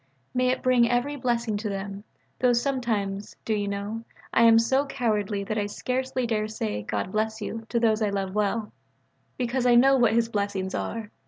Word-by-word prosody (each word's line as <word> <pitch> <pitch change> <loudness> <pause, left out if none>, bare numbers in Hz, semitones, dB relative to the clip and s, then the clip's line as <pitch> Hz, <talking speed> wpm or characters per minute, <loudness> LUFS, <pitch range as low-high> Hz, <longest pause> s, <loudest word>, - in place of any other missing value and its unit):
May 255 0 +2
it 255 - -1
bring 250 -2 +4
every 245 +4 0
blessing 235 -5 -1
to 210 +1 -3
them; 200 0 -5 0.4
though 250 -1 +4
sometimes, 230 -6 -1
do 220 - 0
you 205 -1 -1
know, 200 +3 -4 0.3
I 230 - +5
am 225 0 +7
so 265 +5 +2
cowardly 210 -6 -1
that 215 +2 -2
I 205 - -1
scarcely 255 +3 -2
dare 215 -2 0
to - - -9
say 105 - -3
"God 105 - -3
bless 220 +1 -1
you" 225 +1 -5
to 235 - +1
those 225 -1 +2
I 210 - +2
love 195 -1 -2
well: 210 +1 -1 0.6
because 250 0 -1
we 240 - +6
know 270 +3 +6
what 235 -3 +4
His 230 -1 +3
blessings 200 -3 -2
are. 225 -2 -4
225 Hz, 195 wpm, -26 LUFS, 205-245 Hz, 0.6 s, am